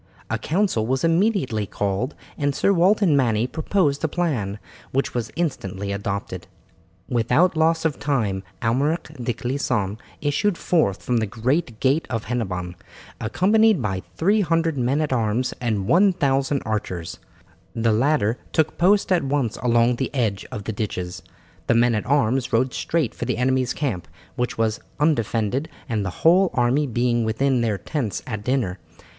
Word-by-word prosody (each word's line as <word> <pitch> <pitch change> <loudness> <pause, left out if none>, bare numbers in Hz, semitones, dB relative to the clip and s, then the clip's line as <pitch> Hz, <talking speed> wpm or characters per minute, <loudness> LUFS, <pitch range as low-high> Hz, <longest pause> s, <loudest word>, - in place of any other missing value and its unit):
A - - 0
council 165 - 0
was 130 +1 0
immediately 165 - +1
called, 100 +9 -2 0.2
and 145 -1 -1
Sir 200 - +3
Walter 195 +4 +4
Manny 125 - +3
proposed 150 +2 0
a - - +3
plan, 140 - -1 0.3
which 135 +1 -1
was 120 -2 -2
instantly 100 - -3
adopted. 100 0 -4 0.6
Without 125 +10 +2
loss 160 +1 +2
of 155 -3 0
time 110 -10 0 0.2
Almeric 145 +8 0
de 120 - 0
Clisson 120 -5 -2 0.2
issued 160 +6 0
forth 130 - +1
from 125 - +1
the 110 -1 0
great 120 - -1
gate 140 +5 +2
of 115 -3 -2
Hennebon, 95 -7 -3 0.5
accompanied 205 - +3
by 95 -5 -2 0.2
300 165 -4 +2
men 130 +3 +1
at 150 -3 0
arms 115 +1 0
and 110 -5 -1
1000 140 - +2
archers. 95 -6 -3 0.6
The 115 -1 +2
latter 125 -1 +2
took 160 -1 +1
post 195 +3 +3
at 180 -4 +3
once 135 -5 -1
along 120 0 +2
the 130 - -1
edge 110 -6 -1
of 105 - -5
the 110 - -4
ditches. 90 -4 -4 0.5
The - - +3
men 120 +1 +4
at 105 - -2
arms 130 -2 +1
rode 125 +3 +2
straight 155 -8 -1
for - - -5
the - - -1
enemy's 130 0 +1
camp, 125 - -2 0.3
which 125 0 -2
was 110 -1 0 0.2
undefended, 130 -1 +1 0.2
the 105 -6 -1
whole 175 - +4
army 130 +4 +2
being 120 -1 +1
within 125 +3 +1
their 110 -3 0
tents 125 -3 -3
at 105 -4 -5
dinner. 115 -8 -1
125 Hz, 150 wpm, -23 LUFS, 110-155 Hz, 0.6 s, Walter